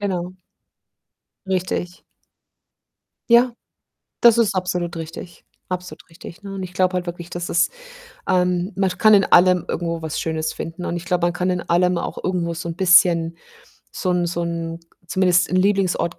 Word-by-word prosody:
Genau. 185 Hz, -2 st, -3 dB, 1.1 s
Richtig. 180 Hz, -1 st, -3 dB, 1.3 s
Ja. 240 Hz, +1 st, +5 dB, 0.7 s
Das 235 Hz, -2 st, +7 dB
ist 220 Hz, -4 st, +2 dB
absolut 180 Hz, -2 st, -2 dB
richtig. 165 Hz, +2 st, -9 dB, 0.3 s
Absolut 180 Hz, 0 st, -6 dB
richtig, 170 Hz, +4 st, -12 dB
ne? 200 Hz, -, -8 dB
Und 190 Hz, -, -5 dB
ich 180 Hz, 0 st, -8 dB
glaube 185 Hz, 0 st, +1 dB
halt 180 Hz, -1 st, -2 dB
wirklich, 175 Hz, 0 st, -7 dB
dass 175 Hz, 0 st, -5 dB
es 170 Hz, -, +2 dB, 0.6 s
ähm, 180 Hz, +1 st, +1 dB
man 195 Hz, 0 st, +1 dB
kann 215 Hz, -1 st, +5 dB
in 195 Hz, -2 st, +5 dB
allem 180 Hz, 0 st, +4 dB
irgendwo 170 Hz, -1 st, -3 dB
was 160 Hz, -1 st, -4 dB
Schönes 160 Hz, -1 st, -2 dB
finden 165 Hz, +2 st, -6 dB
und 175 Hz, -, -3 dB
ich 175 Hz, -, -6 dB
glaube, 175 Hz, -1 st, 0 dB
man 175 Hz, -, 0 dB
kann 180 Hz, +1 st, -1 dB
in 180 Hz, -1 st, -1 dB
allem 180 Hz, +1 st, +1 dB
auch -, -, -4 dB
irgendwo 175 Hz, -2 st, -1 dB
so 165 Hz, +1 st, -5 dB
'n 165 Hz, -, -5 dB
bisschen 175 Hz, -2 st, +4 dB, 0.6 s
so 185 Hz, -, -2 dB
'n 175 Hz, -1 st, +1 dB
so 170 Hz, 0 st, -2 dB
'n 165 Hz, 0 st, -4 dB, 0.3 s
zumindest 180 Hz, -1 st, +2 dB
'n 185 Hz, -, +1 dB
Lieblingsort 185 Hz, -3 st, +1 dB
180 Hz, 165 wpm, -21 LUFS, 170-185 Hz, 1.3 s, Das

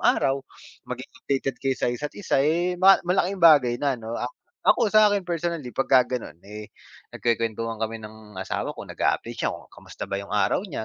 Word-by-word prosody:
araw 135 Hz, 0 st, +2 dB, 1.4 s
sa -, -, -1 dB
isa't 145 Hz, +4 st, -5 dB
isa, 205 Hz, -, 0 dB
eh 170 Hz, +5 st, +1 dB
mas 195 Hz, -1 st, +6 dB
ma 180 Hz, -, +1 dB
malaking 195 Hz, +2 st, -2 dB
bagay, 145 Hz, -8 st, +6 dB
na 135 Hz, -2 st, -1 dB
ano 115 Hz, +1 st, -5 dB
ak 125 Hz, +1 st, -4 dB, 0.3 s
ako 215 Hz, -, +3 dB
sa'kin 205 Hz, -3 st, +5 dB
personally, 170 Hz, -6 st, -3 dB
pag-kaganon, 125 Hz, -, +1 dB
eh 105 Hz, +1 st, -9 dB, 0.5 s
nag -, -, -18 dB
kuwen-kuwentuhan 115 Hz, -1 st, -1 dB
kami 110 Hz, 0 st, -2 dB
ng 110 Hz, -2 st, -12 dB
asawa 95 Hz, -, -3 dB
ko -, -, -7 dB
kung, -, -, -9 dB, 0.8 s
kamusta -, -, -9 dB
ba 100 Hz, 0 st, -3 dB
'yung 100 Hz, -, -10 dB
araw 105 Hz, 0 st, +1 dB
niya 125 Hz, -8 st, -4 dB
125 Hz, 160 wpm, -25 LUFS, 110-170 Hz, 1.4 s, mas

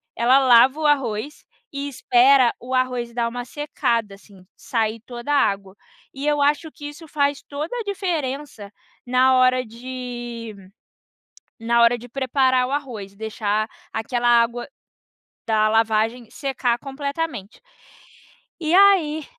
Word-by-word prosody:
ela 245 Hz, +3 st, +4 dB
lava 260 Hz, +2 st, +5 dB
o 310 Hz, -, -2 dB
arroz 275 Hz, -1 st, -1 dB, 0.3 s
e 280 Hz, 0 st, -4 dB
espera 255 Hz, -1 st, +4 dB
o 255 Hz, +2 st, -6 dB
arroz 250 Hz, -2 st, -1 dB
dar 235 Hz, -1 st, 0 dB
uma 245 Hz, +1 st, -5 dB
secada, 235 Hz, -6 st, -2 dB
assim, 195 Hz, -2 st, -19 dB
sair 225 Hz, -1 st, -2 dB
toda 240 Hz, +4 st, -5 dB
a -, -, +4 dB
água. 195 Hz, -1 st, -7 dB, 0.4 s
E 275 Hz, +2 st, -5 dB
eu 295 Hz, -1 st, +2 dB
acho 300 Hz, +2 st, +1 dB
que 290 Hz, -, -11 dB
isso 320 Hz, +2 st, -12 dB
faz 285 Hz, -1 st, 0 dB
toda 300 Hz, +9 st, -5 dB
a -, -, -3 dB
diferença 295 Hz, -, -4 dB, 0.3 s
na 255 Hz, +1 st, +3 dB
hora 255 Hz, 0 st, +3 dB
de 240 Hz, -1 st, -7 dB, 1.1 s
na 235 Hz, +1 st, +2 dB
hora 235 Hz, +1 st, +4 dB
de 245 Hz, +1 st, -12 dB
preparar 260 Hz, 0 st, +1 dB
o -, -, -5 dB
arroz, 235 Hz, -9 st, -5 dB
deixar 215 Hz, 0 st, -2 dB, 0.2 s
aquela 240 Hz, +2 st, -1 dB
água 240 Hz, 0 st, +2 dB, 0.8 s
da 215 Hz, -1 st, +3 dB
lavagem 225 Hz, +1 st, +1 dB
secar 265 Hz, -5 st, -1 dB
completamente. 280 Hz, -5 st, -5 dB, 1.0 s
E 315 Hz, 0 st, 0 dB
aí 360 Hz, -6 st, +4 dB
250 Hz, 135 wpm, -22 LUFS, 230-285 Hz, 1.1 s, lava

